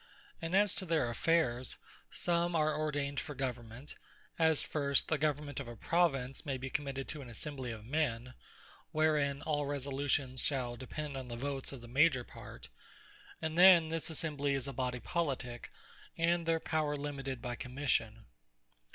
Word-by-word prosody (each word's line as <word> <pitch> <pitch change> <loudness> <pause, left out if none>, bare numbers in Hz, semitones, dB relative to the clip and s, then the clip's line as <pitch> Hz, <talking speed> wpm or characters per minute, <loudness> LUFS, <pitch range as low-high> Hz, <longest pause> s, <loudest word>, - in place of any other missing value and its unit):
And 165 +3 -1
as 205 0 +4
to 190 - -4
their 155 -8 +2
affaires, 130 -3 +1 0.4
some 170 0 +1
are 155 -1 +3
ordained 145 -2 -1
for 145 - -6
Government; 125 0 -5 0.5
As 160 -2 +4
first, 140 -2 +1
the 155 - +2
Government 150 -2 0
of - - -5
a 120 - -7
Province 135 -3 +1
may 140 -4 -2
be 130 0 -5
committed 135 -2 -2
to 155 - -4
an 125 - -9
Assembly 130 +1 -5
of 110 -2 -6
men, 130 -3 -1 0.6
wherein 150 -3 +2
all 145 -2 0
resolutions 140 -2 -1
shall 125 -4 -1
depend 140 +3 -5
on 130 -1 -5
the 120 - -5
Votes 135 +1 -3
of 135 -3 -8
the 120 - -10
major 135 +1 +4
part; - - -11 0.8
and 160 0 -1
then 175 -2 +8
this 165 0 -2
Assembly 145 -3 -1
is 135 0 -3
a 140 - -4
Body 125 -1 -1
Politique, 130 -5 -2 0.5
and 170 0 +2
their 165 0 +3
power 155 -2 0
limited 135 -3 -4
by 125 0 -4
Commission. 125 -3 -1
140 Hz, 160 wpm, -34 LUFS, 130-155 Hz, 0.8 s, then